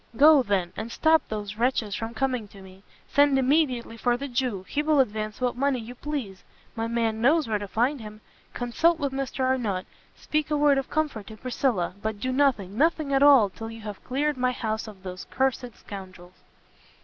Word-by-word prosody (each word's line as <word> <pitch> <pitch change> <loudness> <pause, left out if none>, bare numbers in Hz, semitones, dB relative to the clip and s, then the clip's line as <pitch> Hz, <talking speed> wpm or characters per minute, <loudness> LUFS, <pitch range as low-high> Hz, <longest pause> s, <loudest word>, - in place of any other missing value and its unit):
Go, 300 +1 +7
then, 195 -7 -1
and 220 +2 -5
stop 320 +4 +4
those 210 -1 -5
wretches 230 -3 0
from 225 +2 -4
coming 250 -3 -1
to 195 -1 -14
me, 190 0 -15 0.3
send 285 -1 +4
immediately 260 -4 +1
for 240 +1 +1
the 280 +2 -5
Jew! 245 -7 -2
he 295 - -1
will 305 -1 +2
advance 215 -3 -1
what 250 -1 0
money 275 +1 +1
you 235 +1 -7
please, 250 -8 -5 0.3
my 225 0 -2
man 230 -1 -1
knows 300 +4 +3
where 215 -2 0
to 205 - -6
find 245 +6 0
him; 215 0 -10 0.4
consult 315 +8 +2
with 280 -3 -2
Mr 270 0 -3
Arnott, 240 -8 0 0.3
speak 305 0 -2
a 300 - +1
word 290 -2 +4
of 270 - -6
comfort 295 -10 -2
to 220 - -10
Priscilla, 240 -7 -1
but 215 -1 -3
do 255 +4 -2
nothing, 255 -8 +1
nothing 310 -2 +2
at 270 - +3
all, 280 -7 +7
till 225 +2 -7
you 225 0 -9
have 210 -2 -8
cleared 285 +2 -1
my 255 0 +1
house 220 -2 -3
of 200 -3 -12
those 185 -1 -7
cursed 260 -2 -1
scoundrels!" 185 -2 -11
245 Hz, 195 wpm, -26 LUFS, 215-275 Hz, 0.4 s, Go